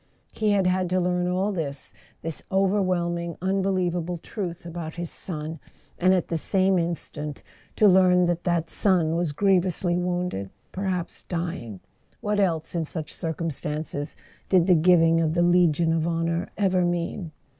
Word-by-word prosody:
He 215 Hz, -1 st, 0 dB
had 195 Hz, -2 st, +2 dB
had 180 Hz, 0 st, +1 dB
to 185 Hz, +1 st, +2 dB
learn 180 Hz, 0 st, 0 dB
all 185 Hz, +3 st, 0 dB
this, 145 Hz, -7 st, -4 dB, 0.3 s
this 165 Hz, -1 st, -3 dB
overwhelming 185 Hz, -3 st, +1 dB
unbelievable 185 Hz, -2 st, 0 dB
truth 175 Hz, -1 st, -6 dB
about 165 Hz, -2 st, -6 dB
his 170 Hz, -1 st, -5 dB
son; 160 Hz, -2 st, -6 dB, 0.4 s
and 185 Hz, +1 st, +4 dB
at 185 Hz, -2 st, +2 dB
the 165 Hz, -, -1 dB
same 190 Hz, +3 st, +2 dB
instant 150 Hz, -3 st, -4 dB, 0.3 s
to 215 Hz, -, +5 dB
learn 180 Hz, -1 st, +5 dB
that 175 Hz, 0 st, -1 dB
that 170 Hz, -2 st, 0 dB
son 175 Hz, -5 st, +2 dB
was 170 Hz, -2 st, 0 dB
griev¬ 190 Hz, +3 st, +3 dB
ously 175 Hz, -1 st, 0 dB
wounded, 175 Hz, -, -2 dB, 0.2 s
perhaps 185 Hz, -2 st, -3 dB
dying 165 Hz, -, -5 dB, 0.4 s
(what 210 Hz, 0 st, -1 dB
else, 170 Hz, -5 st, 0 dB
in 170 Hz, -2 st, 0 dB
such 155 Hz, 0 st, -5 dB
cir¬ 165 Hz, -2 st, -3 dB
cumstances, 150 Hz, -1 st, -3 dB, 0.3 s
did 180 Hz, -3 st, +5 dB
the 185 Hz, -, +5 dB
giving 165 Hz, -1 st, +5 dB
of 160 Hz, 0 st, 0 dB
the 175 Hz, -, +3 dB
Legion 170 Hz, -2 st, +3 dB
of 165 Hz, 0 st, 0 dB
Honour 170 Hz, +2 st, -1 dB
ever 190 Hz, -3 st, +2 dB
mean 175 Hz, 0 st, -2 dB
175 Hz, 155 wpm, -25 LUFS, 165-185 Hz, 0.4 s, to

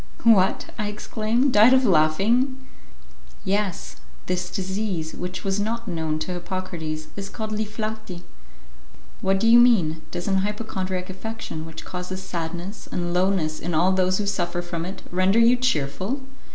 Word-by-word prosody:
"What!" 210 Hz, -4 st, +4 dB
I 210 Hz, -, 0 dB
exclaimed, 220 Hz, +5 st, 0 dB
"died 220 Hz, +5 st, +7 dB
of 260 Hz, 0 st, +5 dB
laughing!" 205 Hz, -, +3 dB, 0.9 s
"Yes. 200 Hz, -2 st, -1 dB, 0.3 s
This 180 Hz, 0 st, -2 dB
disease, 190 Hz, -4 st, -3 dB
which 180 Hz, +1 st, -5 dB
was 195 Hz, 0 st, 0 dB
not 230 Hz, +3 st, -2 dB
known 160 Hz, -4 st, -1 dB
to -, -, -5 dB
Hippocrates, 170 Hz, -4 st, -4 dB
is 195 Hz, 0 st, -5 dB
called 220 Hz, 0 st, -5 dB
li 215 Hz, 0 st, -1 dB
flati." 215 Hz, -4 st, -5 dB, 1.0 s
"What 195 Hz, 0 st, +2 dB
do 225 Hz, -, +2 dB
you 235 Hz, +1 st, +8 dB
mean? 180 Hz, -11 st, +4 dB
Does 175 Hz, -, -5 dB
an 195 Hz, -1 st, +2 dB
hypochondriac 190 Hz, -2 st, -2 dB
affection, 190 Hz, -5 st, -6 dB
which 160 Hz, 0 st, -9 dB
causes 185 Hz, +1 st, -5 dB
sadness 175 Hz, +3 st, -5 dB
and 175 Hz, -1 st, -2 dB
lowness 180 Hz, -4 st, +1 dB
in 175 Hz, -, -2 dB
all 175 Hz, +4 st, +4 dB
those 185 Hz, 0 st, +2 dB
who 210 Hz, -, -1 dB
suffer 175 Hz, -3 st, -1 dB
from 170 Hz, -1 st, -4 dB
it, 190 Hz, +2 st, -7 dB
render 185 Hz, +4 st, +3 dB
you 230 Hz, +2 st, +6 dB
cheerful?" 205 Hz, -, -1 dB
190 Hz, 150 wpm, -24 LUFS, 175-215 Hz, 1.0 s, you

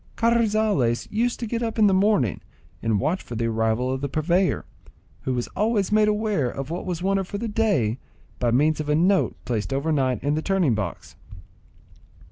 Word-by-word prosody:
Carrizales 215 Hz, -, +2 dB
used 235 Hz, +3 st, 0 dB
to 240 Hz, -, -3 dB
get 230 Hz, +1 st, -3 dB
up 230 Hz, -1 st, -3 dB
in 215 Hz, -, +5 dB
the 200 Hz, -, +4 dB
morning 190 Hz, -, +2 dB, 0.4 s
and 110 Hz, -3 st, +1 dB
watch 160 Hz, -, 0 dB
for 120 Hz, -, -8 dB
the 115 Hz, +1 st, -1 dB
arrival 115 Hz, +3 st, 0 dB
of 130 Hz, -, -4 dB
the 140 Hz, -, -2 dB
purveyor, 170 Hz, +6 st, +1 dB, 0.6 s
who 130 Hz, -, 0 dB
was 120 Hz, -, -2 dB
always 210 Hz, -2 st, 0 dB
made 215 Hz, 0 st, +4 dB
aware 210 Hz, -, 0 dB
of 135 Hz, +4 st, -6 dB
what 175 Hz, -, -4 dB
was 175 Hz, -1 st, -3 dB
wanted 195 Hz, -1 st, 0 dB
for 200 Hz, -, -4 dB
the 230 Hz, +3 st, -3 dB
day 200 Hz, -, +1 dB, 0.4 s
by 120 Hz, -, +1 dB
means 150 Hz, +6 st, +2 dB
of 150 Hz, -1 st, -3 dB
a 150 Hz, -, +3 dB
note 185 Hz, +4 st, +2 dB
placed 115 Hz, 0 st, -2 dB
over 140 Hz, +4 st, 0 dB
night 130 Hz, -4 st, +1 dB
in 145 Hz, +1 st, +1 dB
the 155 Hz, -, 0 dB
turning 185 Hz, -8 st, +1 dB
box. 105 Hz, -5 st, -5 dB
160 Hz, 195 wpm, -24 LUFS, 130-210 Hz, 0.6 s, in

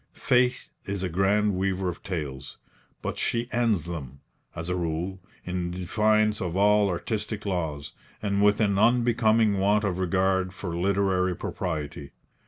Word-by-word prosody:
Fate 125 Hz, 0 st, +1 dB
is 100 Hz, -1 st, -3 dB
a 90 Hz, -, -1 dB
grand 100 Hz, +4 st, +2 dB
weaver 95 Hz, 0 st, -1 dB
of 90 Hz, -, -4 dB
tales; 70 Hz, -7 st, -5 dB, 0.5 s
but -, -, -3 dB
she 120 Hz, 0 st, 0 dB
ends 115 Hz, -8 st, +1 dB
them, 70 Hz, -6 st, -7 dB, 0.4 s
as 80 Hz, +1 st, -5 dB
a 90 Hz, -, -1 dB
rule, 85 Hz, +2 st, -3 dB, 0.3 s
in 90 Hz, -1 st, -2 dB
defiance 105 Hz, +4 st, +1 dB
of 90 Hz, -1 st, -2 dB
all 105 Hz, 0 st, +4 dB
artistic 105 Hz, +4 st, -3 dB
laws, 80 Hz, -7 st, -3 dB, 0.3 s
and 100 Hz, -1 st, 0 dB
with 105 Hz, 0 st, +4 dB
an 100 Hz, -3 st, +2 dB
unbecoming 115 Hz, -3 st, +3 dB
want 105 Hz, +2 st, +3 dB
of 95 Hz, -3 st, -1 dB
regard 95 Hz, 0 st, +1 dB
for 90 Hz, -2 st, -5 dB
literary 95 Hz, 0 st, +1 dB
propriety. 75 Hz, -6 st, -4 dB
95 Hz, 145 wpm, -26 LUFS, 90-105 Hz, 0.5 s, all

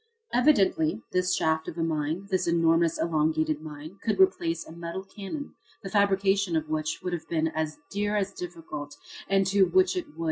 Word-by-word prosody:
Evidently 195 Hz, -, +3 dB
this 180 Hz, 0 st, +2 dB
shaft 160 Hz, 0 st, +1 dB
of 160 Hz, -, -6 dB
a 165 Hz, -, 0 dB
mine, 160 Hz, +3 st, -1 dB
this 185 Hz, -2 st, +1 dB
enormous 165 Hz, 0 st, +3 dB
elongated 155 Hz, -1 st, +1 dB
mine, 155 Hz, +4 st, -9 dB
could 220 Hz, -, -1 dB
replace 350 Hz, -3 st, +2 dB
a -, -, -11 dB
metal 170 Hz, +3 st, -6 dB
cannon 205 Hz, +9 st, -7 dB, 0.3 s
the 195 Hz, -, -6 dB
fabrication 195 Hz, -2 st, +2 dB
of 155 Hz, -1 st, 0 dB
which 155 Hz, 0 st, -2 dB
would 180 Hz, -, -2 dB
have 170 Hz, -, -5 dB
been 160 Hz, -1 st, +1 dB
as 155 Hz, -1 st, -3 dB
dear 205 Hz, +1 st, 0 dB
as 200 Hz, -1 st, -1 dB
difficult 165 Hz, -5 st, -7 dB, 0.3 s
and 195 Hz, 0 st, +3 dB
to 195 Hz, +1 st, +2 dB
which 375 Hz, -, +3 dB
it 360 Hz, -, -3 dB
would. -, -, -15 dB
170 Hz, 180 wpm, -27 LUFS, 160-195 Hz, 0.3 s, Evidently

